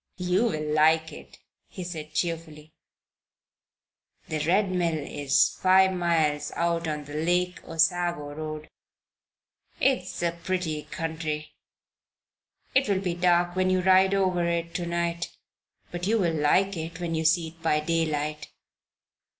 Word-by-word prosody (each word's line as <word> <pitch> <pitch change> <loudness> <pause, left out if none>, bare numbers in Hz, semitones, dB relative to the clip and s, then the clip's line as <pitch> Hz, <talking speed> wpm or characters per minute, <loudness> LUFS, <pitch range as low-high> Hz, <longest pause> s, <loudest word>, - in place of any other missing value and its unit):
You 180 +4 +1
will 155 -7 -1
like 160 +1 +3
it," - - -12 0.3
he 185 - -8
said, 160 -3 -7
cheerfully. 160 -3 -3 1.6
"The 155 - -2
Red 190 +2 +2
Mill 170 -3 0
is 145 -1 +2
five 190 0 +5
miles 160 -4 +1
out 170 -1 0
on 150 -1 -3
the 145 - -10
Lake 175 +3 0
Osago 165 -2 0
Road. 155 0 -6 1.1
It 265 -1 +3
is 180 -1 -7
a 170 - +2
pretty 170 -3 -3
country. 160 -2 -4 1.2
It 260 -3 +3
will 195 -2 +2
be 180 -3 -1
dark 175 0 +2
when 185 0 +2
you 185 0 +2
ride 190 +1 +5
over 185 -3 +1
it 170 0 -2
to 175 -1 -3
night; 170 0 -2 0.5
but 175 +1 -4
you 225 +2 +3
will 175 -6 +1
like 180 +6 +2
it 165 +1 -6
when 170 -2 -3
you 160 0 -1
see 165 0 +2
it 165 +1 -21
by 155 -2 +2
daylight." 155 -2 -1
170 Hz, 140 wpm, -26 LUFS, 155-180 Hz, 1.6 s, five